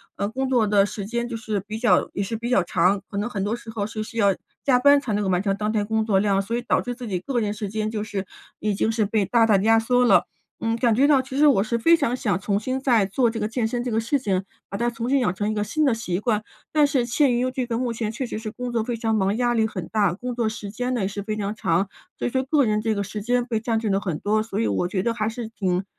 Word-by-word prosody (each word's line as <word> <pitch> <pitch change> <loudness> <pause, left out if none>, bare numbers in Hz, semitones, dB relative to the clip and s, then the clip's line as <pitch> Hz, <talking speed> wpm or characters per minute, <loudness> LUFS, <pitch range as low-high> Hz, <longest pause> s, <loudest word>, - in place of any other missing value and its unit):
嗯， 200 +2 -2
工 265 +2 -2
作 245 -4 +3
的 205 -1 +4
时 205 0 -4
间 235 +3 -2
就 235 -2 -4
是 215 -2 -2
比 215 - -4
较 240 +2 +3
也 200 - -1
是 225 - -3
比 235 +2 -4
较 220 -7 +3
长， 180 +3 +1
可 200 - -6
能 210 +4 -1
很 195 -3 -3
多 210 +3 -1
时 235 -1 -11
候 220 -2 -3
是 215 0 -5
需 230 +2 -7
要 200 -3 +3 0.3
加 255 -3 +4
班 285 +2 +6
才 255 -6 -3
能 205 0 0
够 190 - -1
完 180 +1 +1
成 195 -1 +1
当 210 +1 -2
天 210 -2 0
工 220 +1 0
作 205 -3 +2
量， 195 -1 +2
所 230 +4 -2
以 240 - -4
导 - - +1
致 245 0 -4
自 245 -2 -7
己 185 -3 -2
个 240 +7 -2
人 210 -2 -1
时 210 -2 -5
间 215 +1 -2
就 215 -2 -3
是 200 -2 -4 0.3
已 210 0 -1
经 220 - 0
是 220 -1 +1
被 205 0 +1
大 230 +3 +3
大 210 -3 +4
压 225 +3 +4
缩 245 +2 +2
了。 240 - +5 0.4
嗯， 225 0 0
感 235 -1 +2
觉 270 +6 +4
到 280 -3 +5
其 260 +1 -7
实 300 - +6
我 235 -9 +4
是 235 +2 -1
非 335 +8 +6
常 280 -6 0
想 205 -7 0
重 200 +1 -1
新 260 +4 -3
再 235 -7 +3
做 230 +5 +1
这 225 - -4
个 210 - -1
健 225 +1 -1
身 240 +2 -1
这 245 - -3
个 220 - -1
事 235 +6 +1
情， 195 -6 -1 0.3
把 200 - -4
它 240 +2 +1
重 235 +1 -4
新 275 - +3
养 215 -8 +1
成 205 +2 -2
一 - - -1
个 210 -1 -1
新 300 +9 0
的 265 - +3
习 185 -6 -2
惯， 215 -1 0 0.3
但 300 -1 +5
是 275 -4 +1
陷 250 +2 +2
于 255 +1 +1
这 255 -1 -2
个 230 -1 -2
目 240 -1 -1
前 220 -2 -3
确 245 +4 -4
实 230 - -5
是 215 -1 -5
工 250 +1 -5
作 235 -2 0
非 235 +1 -3
常 225 -1 0
忙， 200 +1 +1
压 245 -1 +2
力 225 -2 +2
很 185 -6 -5
大， 205 -5 +1
工 245 +6 -5
作 230 -2 0
时 210 -2 -7
间 250 +4 -3
呢 235 - -1
也 190 - +1
是 200 0 -5
非 215 0 -3
常 205 +1 -3
长， 180 -1 +1 0.3
所 - - -1
以 - - -1
说 260 +1 0
个 280 -1 +2
人 215 0 +1
这 220 0 0
个 200 -1 -2
时 210 +2 -6
间 245 +2 +1
被 225 -3 -2
占 225 -1 0
据 220 - -3
了 195 0 +1
很 170 -6 -3
多， 215 +1 +1
所 225 - -4
以 115 - +1
我 105 - 0
觉 185 0 -1
得 230 +3 0
还 220 -1 -1
是 230 0 -5
挺 190 -4 -1
220 Hz, 335 characters per minute, -23 LUFS, 205-240 Hz, 0.4 s, 班